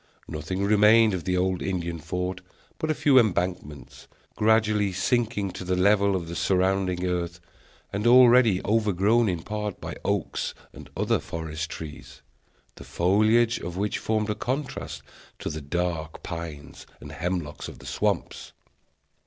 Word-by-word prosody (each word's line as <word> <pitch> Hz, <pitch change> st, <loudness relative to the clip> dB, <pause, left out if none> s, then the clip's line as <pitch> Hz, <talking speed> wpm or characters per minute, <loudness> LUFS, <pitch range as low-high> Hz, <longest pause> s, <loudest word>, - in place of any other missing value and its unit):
Nothing 80 Hz, +5 st, -4 dB
remained 105 Hz, +1 st, +5 dB
of 90 Hz, -3 st, -4 dB
the 90 Hz, -1 st, 0 dB
old 90 Hz, 0 st, 0 dB
Indian 85 Hz, -3 st, -3 dB
fort 90 Hz, +3 st, -4 dB, 0.4 s
but 155 Hz, -, -2 dB
a 155 Hz, -, +1 dB
few 140 Hz, -3 st, +5 dB
embankments, 80 Hz, -, -2 dB, 0.3 s
gradually 105 Hz, -2 st, +2 dB
sinking 105 Hz, 0 st, 0 dB
to 90 Hz, -, -7 dB
the 90 Hz, 0 st, 0 dB
level 100 Hz, +1 st, +3 dB
of 85 Hz, -3 st, -3 dB
the 85 Hz, -, -6 dB
surrounding 95 Hz, -1 st, +1 dB
earth, 90 Hz, -1 st, -2 dB, 0.5 s
and 105 Hz, +3 st, 0 dB
already 120 Hz, -5 st, +6 dB
overgrown 110 Hz, +1 st, +2 dB
in 85 Hz, -3 st, -3 dB
part 105 Hz, -2 st, -4 dB
by -, -, -6 dB
oaks -, -, -2 dB, 0.2 s
and -, -, -12 dB
other -, -, +1 dB
forest 80 Hz, 0 st, -5 dB
trees, 75 Hz, -2 st, -9 dB, 0.5 s
the -, -, -10 dB
foliage 110 Hz, +6 st, +2 dB
of 85 Hz, +1 st, -6 dB
which 105 Hz, +1 st, -1 dB
formed 110 Hz, -1 st, -1 dB
a -, -, +1 dB
contrast 130 Hz, +6 st, -4 dB, 0.3 s
to -, -, -4 dB
the 80 Hz, -, -5 dB
dark 80 Hz, +1 st, -3 dB
pines 80 Hz, -4 st, -7 dB
and -, -, -10 dB
hemlocks 85 Hz, -4 st, -4 dB
of -, -, -10 dB
the -, -, -14 dB
swamps. -, -, -2 dB
95 Hz, 145 wpm, -26 LUFS, 85-105 Hz, 0.5 s, already